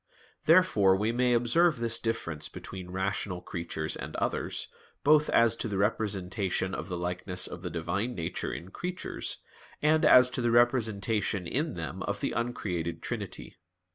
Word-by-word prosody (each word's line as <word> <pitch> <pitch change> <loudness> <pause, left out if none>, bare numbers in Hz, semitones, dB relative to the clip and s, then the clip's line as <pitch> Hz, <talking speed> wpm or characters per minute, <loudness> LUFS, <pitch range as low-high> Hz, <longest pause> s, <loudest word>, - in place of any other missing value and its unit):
Therefore 155 - +5
we 105 +4 +1
may 125 +1 +2
observe 150 +7 +3
this 115 0 +1
difference 85 -10 -2
between 95 -2 -8
rational 95 0 -2
creatures 85 -3 -4
and - - -7
others, - - -2 0.4
both 150 +1 +5
as 115 -1 +4
to - - -2
the 100 -3 -2
representation 95 -2 -1
of - - -5
the 90 - -3
likeness 90 +1 -2
of 90 - -6
the 90 - -4
Divine 85 +9 -2
Nature 85 0 -3
in 90 - -7
creatures, 180 - -4 0.4
and 155 +1 +3
as 125 0 +7
to 125 - -1
the 120 - +2
representation 110 -5 +2
in 145 - -1
them 80 -4 -5
of - - -2
the - - -1
uncreated 90 -9 -3
Trinity. - - -5
100 Hz, 155 wpm, -29 LUFS, 90-120 Hz, 0.4 s, as